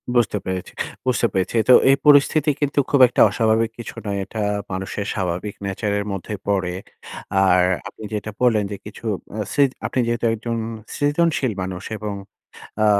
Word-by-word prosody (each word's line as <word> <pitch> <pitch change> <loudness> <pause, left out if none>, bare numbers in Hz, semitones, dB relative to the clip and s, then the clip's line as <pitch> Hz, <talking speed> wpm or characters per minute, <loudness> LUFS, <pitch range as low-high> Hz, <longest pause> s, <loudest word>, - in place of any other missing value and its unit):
বুঝতে 115 -3 +2
পেরেছি, 95 -1 -4 0.3
বুঝতে 125 -2 +2
পেরেছি। 95 +4 -1
তো 125 - +10 0.2
এই 135 - +7
পরিস্থিতি 150 +1 +5
কিন্তু 145 0 +1
খুব 140 - +3
একটা 120 - +1
অস্বাভাবিক 110 0 +1
কিছু 115 - -7
নয়। 100 -1 -2
এটা 110 +3 -5 0.3
মানুষের 95 +2 -4
স্বাভাবিক 95 +1 -3
nature 100 +1 -2
এর 100 - -3
মধ্যেই 100 +1 -5
পড়ে। 95 -3 0 0.7
আর 90 0 +5 0.3
আপনি 105 - -11
যেটা 105 0 -3
বললেন 115 -4 +3
যে - - -3
কিছু 105 +2 -10 0.3
আ - - -3
সৃ 145 - +4 0.2
আপনি 130 - -1
যেহেতু 120 0 -1
একজন 115 +1 -3 0.4
সৃজনশীল 145 -3 +1
মানুষ 95 0 -5
এবং 105 0 -4 0.7
আ - - +5
110 Hz, 160 wpm, -21 LUFS, 95-125 Hz, 0.7 s, তো